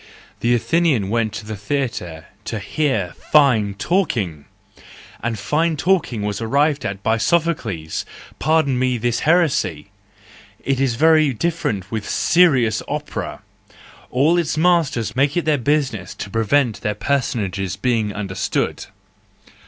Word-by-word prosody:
The 120 +1 +2
Athenian 135 - +1
went 115 -2 +1
to 110 -1 -6
the 110 0 -5
theatre 100 - -3 0.2
to 110 - -3
hear 110 - -1 0.2
fine 120 -9 +4
talking! 100 - -1 0.8
And 115 -1 -2
fine 150 +10 0
talking 155 - +1
was 105 +1 -3
arrived 140 +6 +1
at 100 0 -6
by 110 +1 +2
Sophocles!— 115 - -1 0.4
pardon 155 -5 +2
me 130 -1 +1
this 120 +1 0
heresy!—It 150 - +1 0.9
is 135 -3 +1
very 155 0 +4
different 110 - -2
with 110 -2 -4
serious 130 -11 +3
opera: - - -5 0.7
all 155 +7 +3
its 160 -2 -1
masters 160 -10 +1
make 140 +4 +2
it 175 - 0
their 150 -3 +2
business 130 -8 -1
to 100 - -7
prevent 115 +2 +1
their 105 0 -1
personages 100 -7 -1
being 110 0 0
understood. 95 -2 -2
120 Hz, 125 wpm, -20 LUFS, 105-150 Hz, 0.9 s, fine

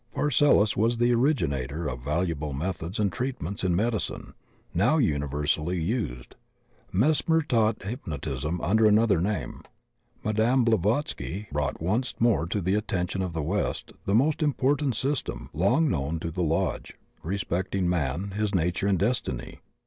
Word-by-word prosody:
Paracelsus 145 -7 +3
was 115 +3 +2
the 120 +1 +3
originator 80 - 0
of 60 -4 -4
valuable 75 +1 -1
methods 85 +5 -3
and 100 -3 +1
treatments 125 -8 -3
in 90 -2 +2
medicine 110 +3 -2 0.4
now 115 - +3
universally 75 - 0
used. 80 - -3 0.6
Mesmer 155 - +3
taught 115 -6 +1
hypnotism 80 - -4
under 110 +4 +4
another 105 -4 +4
name. 90 - -2 0.6
Madame 110 +4 +2
Blavatsky 110 - 0
brou^t 75 -2 -1
once 110 +10 -1
more 115 -8 +2
to 100 +4 -1
the 95 +2 0
attention 95 -3 -1
of 90 -2 -3
the 80 -2 -2
West 100 +7 -2
the 100 - +2
most 150 +7 +2
important 145 -2 +1
system, 120 - -2
long 100 - +3
known 75 - -1
to 85 - -4
the 90 - -3
Lxxlge, 80 -1 -1 0.3
respecting 95 +1 -1
man, 85 +3 -1
his 105 0 -1
nature 90 +3 0
and 100 -2 +3
destiny. 95 - -2
95 Hz, 140 wpm, -27 LUFS, 80-115 Hz, 0.6 s, under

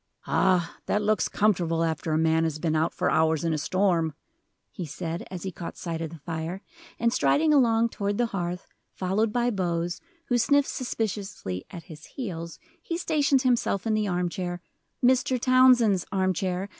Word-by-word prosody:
"Ah, 180 -3 +1
that 210 - +1
looks 215 +1 +1
comfortable 175 -6 +1
after 160 0 -2
a 155 - +2
man 160 0 +2
has 160 -2 -1
been 160 0 -1
out 160 +2 +1
for - - 0
hours 160 0 +2
in 165 -1 +1
a - - 0
storm," 170 -3 +1 0.6
he 180 - -6
said, 165 +2 -5
as 185 -2 -7
he 190 - -3
caught 170 -1 -8
sight 165 -2 -4
of 165 - -3
the 165 - -10
fire; 165 +5 -5 0.3
and 235 0 +1
striding 305 +3 +3
along 235 -4 +4
toward 205 -2 -2
the 240 - +2
hearth, 180 -4 -4 0.2
followed 200 +4 0
by 245 +1 +1
Bose, 175 -3 -2 0.3
who 245 -1 +2
sniffed 285 +3 +3
suspiciously 200 - -4
at 170 - -9
his 160 -3 -12
heels, 170 -9 -6 0.2
he 335 0 -3
stationed 290 -5 +2
himself 240 -6 +1
in 225 - +1
the 215 -1 +1
arm 180 -1 0
chair 175 0 -4 0.5
Mr. 255 0 +3
Townsend's 245 -7 +4
arm 190 -1 +1
chair! 185 +2 -2
185 Hz, 180 wpm, -26 LUFS, 165-230 Hz, 0.6 s, along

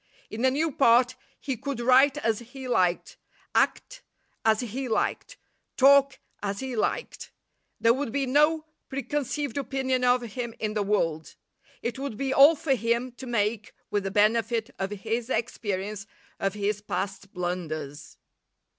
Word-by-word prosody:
In 225 +3 -4
a - - +6
new 305 +4 0
part 250 -1 +4 0.2
he 270 -3 -3
could 265 +2 -5
write 260 +4 +5
as 225 -7 0
he 255 +2 -9
liked; 180 -7 +1 0.4
act - - 0 0.4
as 220 0 +3
he 250 +2 -4
liked; 220 - -1 0.4
talk 275 0 +6 0.2
as 200 -1 -3
he 265 -2 -4
liked. 230 - -2 0.5
There 230 +1 +5
would 265 -2 -3
be 280 +2 0
no 300 +4 +3 0.2
preconceived 275 0 -2
opinion 265 -2 -1
of 250 0 +3
him 235 0 -5
in 215 -1 -2
the 210 - 0
world; 165 -6 -1 0.5
it 235 +2 -3
would 275 -6 -4
be 270 +1 -1
all 285 +5 +8
for 295 -2 0
him 235 +1 0
to 255 +2 -10
make 215 -2 -1 0.2
with 205 -1 0
the 195 - -2
benefit 225 +3 +1
of 195 0 -1
his 225 +4 -3
experience 205 -4 -3 0.3
of 195 +1 -1
his 210 0 -1
past 200 -1 -4
blunders. 155 -5 -5
235 Hz, 150 wpm, -27 LUFS, 210-265 Hz, 0.5 s, all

